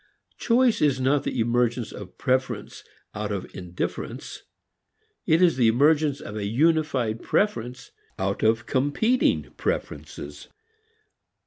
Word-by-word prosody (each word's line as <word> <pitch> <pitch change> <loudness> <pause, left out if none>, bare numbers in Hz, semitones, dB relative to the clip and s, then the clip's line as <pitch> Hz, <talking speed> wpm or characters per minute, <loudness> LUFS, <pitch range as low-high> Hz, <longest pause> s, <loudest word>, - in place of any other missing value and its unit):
Choice 245 0 +3
is 140 -3 +3
not 135 +2 +1
the 125 - -2
emergence 120 0 +1
of 95 -3 -10
preference 130 +1 -1 0.3
out 105 -1 -4
of 100 -3 -3
indifference. 90 -1 -5 0.9
It 165 +3 +4
is 170 -6 +4
the 120 -3 +4
emergence 145 +4 +3
of 100 - -8
a 105 -2 -2
unified 135 -3 +1
preference 125 - -1 0.3
out 100 +1 -2
of 110 +1 +2
competing 145 - +1
preferences. - - -4
130 Hz, 115 wpm, -25 LUFS, 110-150 Hz, 0.9 s, It